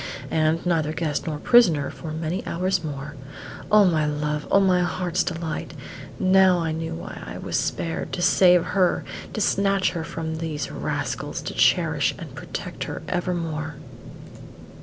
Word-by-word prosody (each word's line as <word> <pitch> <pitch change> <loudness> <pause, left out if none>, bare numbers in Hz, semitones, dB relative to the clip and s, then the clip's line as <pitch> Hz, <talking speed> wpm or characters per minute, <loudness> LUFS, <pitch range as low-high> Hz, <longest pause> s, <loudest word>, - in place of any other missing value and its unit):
and, 160 +2 +1
neither 160 -3 +1
guest 155 -3 -2
nor 155 -2 -2
prisoner 165 - +4
for 160 - -8
many 160 +4 -3
hours 185 0 0
more. 145 -1 -5 0.6
O 210 -1 +7
my 160 -4 +2
love! 150 0 -2
O 200 - +5
my 185 -2 +3
heart's 180 0 0
delight! 165 -2 -4 0.4
Now 185 -1 +5
I 165 -2 -1
knew 160 - -3
why 85 - -8
I - - -7
was - - -4
spared; 165 -1 -2
to 175 - -2
save 180 -1 +5
her; 185 -3 +1 0.3
to - - -3
snatch 195 -1 +2
her 165 -2 -4
from 160 0 -4
these 155 -4 -3
rascals; - - -3
to - - -5
cherish - - +2
and - - -9
protect - - -6
her - - -6
evermore! 165 -4 -2
165 Hz, 155 wpm, -24 LUFS, 155-185 Hz, 0.6 s, O